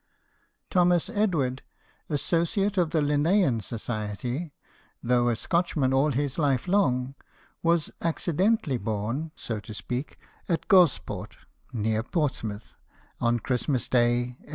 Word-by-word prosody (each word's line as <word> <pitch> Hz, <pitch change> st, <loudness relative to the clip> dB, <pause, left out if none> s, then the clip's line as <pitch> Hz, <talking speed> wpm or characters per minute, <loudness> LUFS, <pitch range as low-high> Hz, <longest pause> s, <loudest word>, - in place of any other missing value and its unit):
Thomas 180 Hz, +1 st, +3 dB
Edward, 160 Hz, -, 0 dB, 0.5 s
associate 170 Hz, +7 st, +1 dB
of 170 Hz, -3 st, +2 dB
the 160 Hz, -1 st, +1 dB
Linnean 150 Hz, -, +2 dB
Society, 115 Hz, -, -4 dB, 0.5 s
though 120 Hz, 0 st, +3 dB
a 120 Hz, -, +1 dB
Scotchman 150 Hz, 0 st, 0 dB
all 140 Hz, +3 st, +3 dB
his 140 Hz, +2 st, -1 dB
life 140 Hz, -1 st, +1 dB
long, 135 Hz, -9 st, +2 dB, 0.5 s
was 170 Hz, -1 st, +2 dB
accidentally 170 Hz, -, +1 dB
born 115 Hz, +9 st, -2 dB
(so 115 Hz, -3 st, -4 dB
to 105 Hz, +1 st, -9 dB
speak) 125 Hz, +7 st, -4 dB, 0.3 s
at 170 Hz, -, -1 dB
Gosport, 180 Hz, -9 st, +3 dB, 0.3 s
near 110 Hz, -1 st, 0 dB
Portsmouth, 120 Hz, -, -3 dB, 0.5 s
on 120 Hz, -1 st, +1 dB
Christmas 130 Hz, +1 st, -1 dB
Day, 120 Hz, -1 st, +3 dB, 0.2 s
1814. -, -, -20 dB
140 Hz, 115 wpm, -27 LUFS, 120-170 Hz, 0.5 s, Thomas